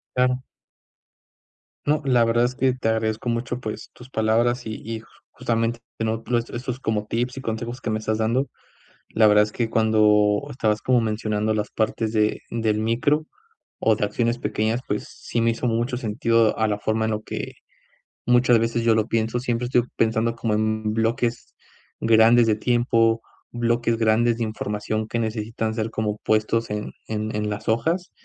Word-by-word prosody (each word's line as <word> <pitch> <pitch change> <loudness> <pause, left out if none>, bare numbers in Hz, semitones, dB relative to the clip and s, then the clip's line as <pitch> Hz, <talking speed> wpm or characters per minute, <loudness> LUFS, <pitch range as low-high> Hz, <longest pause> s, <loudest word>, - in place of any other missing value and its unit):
Claro. 125 0 +2 1.4
No, 150 +1 +2
la 125 -3 +4
verdad 115 +1 +2
es 125 - -1
que 130 0 +1
te 125 -3 -1
agradezco 110 +1 -1
mucho, 120 +1 -2
pues, 110 -4 -6
tus 125 - -13
palabras 115 +2 +1
y 110 - -4
y, 115 -1 -4 0.3
justamente, 115 0 -1 0.2
¿no?, 110 0 -1 0.2
estos 120 - -3
estos 125 +1 -4
como 105 -4 -2
tips 120 +4 -2
y - - -4
consejos 120 +1 -4
que 120 - -3
me 110 - 0
estás 110 0 -2
dando. 120 +5 +1 0.6
La 110 -1 +5
verdad 105 0 +6
es 105 - -7
que 115 -2 -2
cuando 105 -2 +3
estabas 110 -4 0
como 125 -1 +3
mencionando 110 -1 -1
las 105 -1 -2
partes 110 0 -1
de 105 -1 +1
del 110 -2 0
micro, 135 +8 +1 0.5
o - - +3
de - - 0
acciones 120 0 0
pequeñas, 110 0 -1
pues, 105 - -1
sí 120 - -4
me 115 0 +3
hizo 115 - -3
mucho 120 +3 0
sentido 115 -1 +1
a 110 - +3
la 105 -1 -1
forma 110 +1 0
en 110 - 0
lo 105 0 -3
que - - -5 0.7
muchas 120 -1 +4
veces 115 +1 0
yo 115 -1 +4
lo 110 -1 +1
pienso, 115 +1 0
siempre 120 -1 -1
estoy 120 -1 +3
pensando 115 +1 +1
como 115 -2 -1
en 110 0 0
bloques 115 +1 -1 0.5
grandes 115 +1 +6
de 110 - +3
tiempo, 115 0 +2 0.3
bloques 120 0 0
grandes 115 +1 +2
de 115 - -1
información 110 0 -3
que 115 - -2
necesitan 110 0 -2
ser 110 0 -2
como 105 -1 -2
puestos 110 +1 +1
en 105 0 -3 0.2
en 110 0 -3
en 105 0 -1
las 105 +1 -4
hojas, 165 +11 0
115 Hz, 175 wpm, -23 LUFS, 110-120 Hz, 1.4 s, verdad